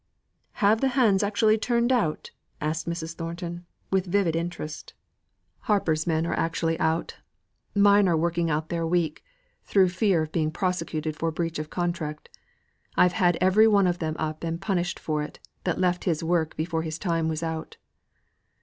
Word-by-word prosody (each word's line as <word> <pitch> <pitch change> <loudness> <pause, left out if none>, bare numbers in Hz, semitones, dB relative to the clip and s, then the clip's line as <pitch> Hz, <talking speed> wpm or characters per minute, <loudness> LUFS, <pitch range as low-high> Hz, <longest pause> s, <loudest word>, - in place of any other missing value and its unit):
"Have 215 +2 +3
the 270 - +3
hands 210 -7 +4
actually 215 +1 +2
turned 240 +2 +1
out?" 210 -12 0 0.3
asked 155 +2 -2
Mrs. 165 -1 -4
Thornton, 170 +1 -6 0.2
with 190 -1 +1
vivid 175 -3 +1
interest. 165 -2 -5 0.7
"Hamper's 165 -7 +1
men 160 -1 +1
are - - -1
actually 165 0 -1
out. 160 +1 0 0.6
Mine 205 0 +5
are 170 -2 +3
working 170 +1 0
out 155 +1 -1
their 165 -1 -1
week, 165 -2 0 0.4
through 190 -2 +3
fear 180 -2 +2
of 155 - -7
being 155 -2 0
prosecuted 160 -3 -2
for 165 +1 -1
breach 165 0 -3
of 155 0 -5
contract. 170 -4 -3 0.7
I'd 180 - +5
have 175 -3 +2
had - - -5
every 195 +4 +5
one 200 -3 +4
of 175 -1 0
them 155 -1 -2
up 155 0 -3
and 165 0 -2
punished 175 -3 -1
for 155 -1 -2
it, 150 - -6 0.3
that 180 - 0
left 180 -1 +1
his 165 -4 0
work 165 -1 0
before 160 0 -1
his 160 -1 -4
time 165 -4 0
was 160 +1 -3
out." 160 -1 -4
170 Hz, 170 wpm, -26 LUFS, 160-185 Hz, 0.7 s, Mine